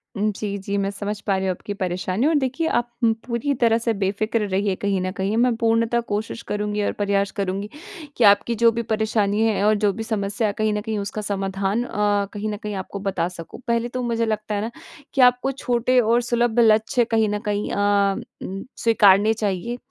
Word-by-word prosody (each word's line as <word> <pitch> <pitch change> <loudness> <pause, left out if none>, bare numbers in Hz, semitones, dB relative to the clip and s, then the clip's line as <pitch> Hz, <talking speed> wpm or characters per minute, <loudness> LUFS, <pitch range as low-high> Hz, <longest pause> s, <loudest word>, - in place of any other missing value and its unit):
उम, 210 +1 +1
जी, 200 0 -4
जी। 200 +1 -3
मैं 195 0 0
समझ 205 +1 -4
पा 200 - 0
रही 190 - -2
हूँ - - +2
आपकी 195 +3 -6
परेशानी 185 +5 -1
और 320 - +2
देखिए 275 +3 0
आप 240 0 -1
उम, 225 -1 +5
पूरी 240 +4 -1
तरह 230 -1 +4
से 230 0 0
बेफ़िकर 205 +3 -1
रहिए 195 +1 0
कहीं 195 -1 -1
न 185 0 -2
कहीं, 195 +2 -1
मैं 240 0 +3
पूर्णतः 230 +1 +2
कोशिश 215 +2 -3
करुँगी 210 0 -1
और - - 0
प्रयास 200 -1 +1
करुँगी 195 +1 -2 0.5
कि 245 - +2
आपकी 205 +3 +5
जो 230 +1 +4
भी 235 +1 -2
परेशानी 215 -1 +1
है 220 -3 +2
और 215 0 +4
जो 205 -1 +2
भी 225 - -5
समस्या 215 -1 -1
है 205 - -2
कहीं 215 0 +1
न 210 - -1
कहीं 220 -1 -3
उसका 205 +1 -4
समाधान 195 +1 -1
अ, 205 -3 0
कहीं 210 +1 -3
न 210 - -3
कहीं 210 -1 -6
आपको 190 +1 -5
बता 195 -3 -1
सकूँ। 170 -2 -10
पहले 235 0 +1
तो 255 +1 -4
मुझे 230 -1 0
लगता 215 -1 -2
है 205 - -1
ना 225 +2 -3 0.4
कि 275 - +2
आपको 250 +1 +4
छोटे 250 -1 +1
और 235 +1 +3
सुलभ 240 -1 +1
लक्ष्य 225 +1 +4
कहीं 220 -2 +1
न 210 0 -1
कहीं 205 0 -1
अ, 200 -1 +2 0.3
उम, 195 +1 -5
स्वीकारने 210 -2 +5
चाहिए। 215 +2 -2
210 Hz, 215 wpm, -22 LUFS, 200-230 Hz, 0.5 s, उम